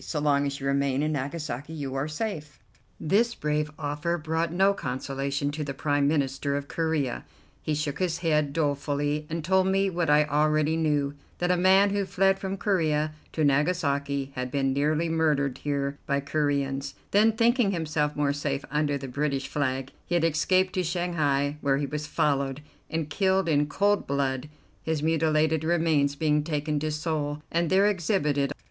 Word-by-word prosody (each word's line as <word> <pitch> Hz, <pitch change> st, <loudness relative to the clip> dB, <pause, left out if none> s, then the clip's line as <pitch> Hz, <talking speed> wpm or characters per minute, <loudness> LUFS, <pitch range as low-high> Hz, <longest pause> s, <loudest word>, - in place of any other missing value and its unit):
So 155 Hz, -, -3 dB
long 145 Hz, -1 st, +2 dB
as 140 Hz, 0 st, -4 dB
you 135 Hz, -, -6 dB
remain 140 Hz, 0 st, +1 dB
in 155 Hz, -, 0 dB
Nagasaki 145 Hz, 0 st, -4 dB
you 140 Hz, -4 st, -4 dB
are 135 Hz, +2 st, -1 dB
safe." 150 Hz, -, -4 dB, 0.4 s
This 225 Hz, +9 st, +2 dB
brave 150 Hz, 0 st, -1 dB
offer 150 Hz, +3 st, -2 dB
brought 160 Hz, +1 st, -1 dB
no 195 Hz, +3 st, +3 dB
consolation 140 Hz, -1 st, -3 dB
to 150 Hz, +1 st, -4 dB
the 140 Hz, -1 st, -5 dB
Prime 145 Hz, 0 st, +1 dB
Minister 140 Hz, -1 st, 0 dB
of 140 Hz, 0 st, -5 dB
Corea: 160 Hz, -6 st, -1 dB, 0.4 s
he 155 Hz, -, -1 dB
shook 145 Hz, -1 st, -3 dB
his 175 Hz, -3 st, 0 dB
head 150 Hz, -3 st, +2 dB
dolefully, 145 Hz, 0 st, -1 dB
and 165 Hz, -1 st, -3 dB
told 190 Hz, +1 st, +3 dB
me 195 Hz, 0 st, +2 dB
what 170 Hz, -3 st, -1 dB
I 150 Hz, +1 st, +6 dB
already 155 Hz, +1 st, +2 dB
knew, 150 Hz, -3 st, +1 dB, 0.2 s
that 175 Hz, 0 st, +1 dB
a -, -, +4 dB
man 190 Hz, +3 st, +5 dB
who 200 Hz, -1 st, 0 dB
fled 195 Hz, +1 st, +2 dB
from 195 Hz, 0 st, -3 dB
Corea 155 Hz, -6 st, +1 dB, 0.2 s
to 155 Hz, -, 0 dB
Nagasaki 140 Hz, -2 st, +1 dB
had 125 Hz, -1 st, -3 dB
been 135 Hz, 0 st, 0 dB
nearly 150 Hz, +4 st, +1 dB
murdered 150 Hz, -5 st, +1 dB
here 140 Hz, -1 st, -2 dB
by 140 Hz, -1 st, +1 dB
Coreans, 140 Hz, -1 st, -1 dB, 0.2 s
then, 215 Hz, +2 st, +4 dB
thinking 235 Hz, 0 st, +3 dB
himself 155 Hz, -4 st, -1 dB
more 145 Hz, -1 st, +1 dB
safe 145 Hz, -1 st, -3 dB
under 150 Hz, -1 st, +1 dB
the 135 Hz, -1 st, -7 dB
British 140 Hz, +1 st, -2 dB
flag, 135 Hz, -2 st, -2 dB, 0.2 s
he 175 Hz, -, 0 dB
had 170 Hz, -, +2 dB
escaped 185 Hz, +4 st, +2 dB
to 185 Hz, -, 0 dB
Shanghai, 155 Hz, -5 st, 0 dB
where 135 Hz, -1 st, +2 dB
he 145 Hz, -, -1 dB
was 150 Hz, +2 st, -4 dB
followed 140 Hz, -2 st, 0 dB, 0.3 s
and 160 Hz, -1 st, -2 dB
killed 190 Hz, +3 st, +1 dB
in 145 Hz, -2 st, +2 dB
cold 200 Hz, +7 st, +1 dB
blood, 140 Hz, 0 st, -1 dB, 0.3 s
his 160 Hz, -2 st, -2 dB
mutilated 160 Hz, -1 st, +2 dB
remains 160 Hz, -4 st, +2 dB
being 150 Hz, -1 st, +1 dB
taken 150 Hz, -1 st, -1 dB
to 155 Hz, +1 st, -2 dB
Seoul, 150 Hz, -1 st, -2 dB
and 170 Hz, -1 st, +1 dB
there 190 Hz, +2 st, +4 dB
exhibited. 155 Hz, -8 st, +1 dB
150 Hz, 175 wpm, -27 LUFS, 140-165 Hz, 0.4 s, I